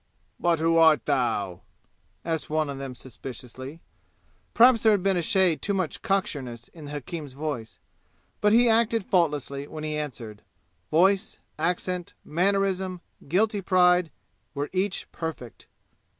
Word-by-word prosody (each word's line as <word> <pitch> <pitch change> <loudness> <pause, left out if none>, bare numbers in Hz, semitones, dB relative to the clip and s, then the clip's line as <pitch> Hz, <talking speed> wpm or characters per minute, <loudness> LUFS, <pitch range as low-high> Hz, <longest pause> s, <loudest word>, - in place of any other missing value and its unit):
"But 170 -1 +2
who 165 +1 +2
art 160 -2 +5
thou?" 115 - 0 0.6
asked 160 -2 -2
one 155 -1 0
of 135 - -7
them 135 -2 -6
suspiciously. 130 +4 -9 0.7
Perhaps 235 -1 +7
there 220 -1 +5
had 200 -3 0
been 195 -1 +2
a 175 - +1
shade 190 -5 +2
too 200 - 0
much 185 -5 -2
cocksureness 145 - -2
in 160 -3 -12
the 145 - -8
hakim's 145 0 -6
voice, 140 -6 -5 0.6
but 210 - +4
he 240 +2 +5
acted 225 -2 +2
faultlessly 145 -5 0
when 155 0 -7
he 155 0 -2
answered. 120 -8 -6 0.5
Voice, 190 +6 +3 0.2
accent, 180 +1 -2
mannerism, 190 +1 0 0.3
guilty 205 +6 +1
pride, 180 -2 +4 0.5
were 145 +1 -3
each 190 +1 -1
perfect. 160 -8 -7
165 Hz, 135 wpm, -26 LUFS, 140-190 Hz, 0.7 s, Perhaps